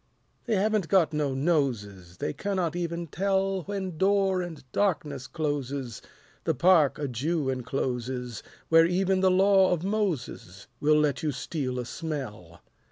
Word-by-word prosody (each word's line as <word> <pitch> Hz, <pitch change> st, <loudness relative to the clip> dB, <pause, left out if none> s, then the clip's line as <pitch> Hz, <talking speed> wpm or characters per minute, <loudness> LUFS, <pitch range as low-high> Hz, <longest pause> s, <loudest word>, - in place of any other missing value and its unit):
They 230 Hz, -, +1 dB
haven't 210 Hz, -2 st, +1 dB
got 175 Hz, -5 st, +3 dB
no 145 Hz, -3 st, 0 dB
noses, 115 Hz, -, -1 dB
They -, -, -2 dB
cannot 180 Hz, 0 st, -2 dB
even 170 Hz, -1 st, -3 dB
tell 195 Hz, +3 st, 0 dB
When 190 Hz, -5 st, -4 dB
door 195 Hz, -1 st, +3 dB
and 165 Hz, -5 st, -7 dB
darkness 150 Hz, -9 st, -1 dB
closes 140 Hz, -6 st, -3 dB, 0.4 s
The -, -, 0 dB
park 170 Hz, -6 st, +4 dB
a 145 Hz, -, -2 dB
Jew 140 Hz, +3 st, -1 dB
encloses, 125 Hz, -2 st, -3 dB, 0.3 s
Where 165 Hz, 0 st, +6 dB
even 190 Hz, +2 st, +1 dB
the 190 Hz, 0 st, +4 dB
Law 190 Hz, +1 st, +5 dB
of 175 Hz, -2 st, 0 dB
Moses 180 Hz, -, -3 dB
Will 150 Hz, +1 st, +4 dB
let 150 Hz, 0 st, +1 dB
you 155 Hz, -2 st, 0 dB
steal 130 Hz, 0 st, -3 dB
a 125 Hz, -, -3 dB
smell. 120 Hz, -, -6 dB
155 Hz, 145 wpm, -27 LUFS, 130-185 Hz, 0.4 s, Where